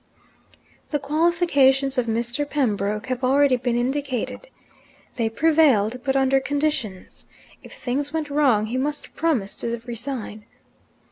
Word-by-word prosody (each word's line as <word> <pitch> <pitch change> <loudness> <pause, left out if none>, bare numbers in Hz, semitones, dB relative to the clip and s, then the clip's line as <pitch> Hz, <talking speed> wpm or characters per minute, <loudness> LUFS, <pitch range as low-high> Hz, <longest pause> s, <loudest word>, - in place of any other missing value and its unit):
The 295 - 0
qualifications 285 -3 +2
of 250 -2 0
Mr. 240 +6 -2
Pembroke 210 -6 -1
have 255 0 -4
already 270 +1 +4
been 245 -1 -1
indicated. 270 - -2 0.7
They 230 -2 0
prevailed 255 -5 +3
but 270 0 0
under 270 0 +3
conditions. 280 -8 -3 0.3
If - - -13
things 280 +3 -3
went 310 -2 -3
wrong, 265 -8 +3
he 235 +4 -3
must 290 +2 -4
promise 270 -12 0
to 235 0 -3
resign. 235 -3 -6
265 Hz, 125 wpm, -23 LUFS, 235-290 Hz, 0.7 s, already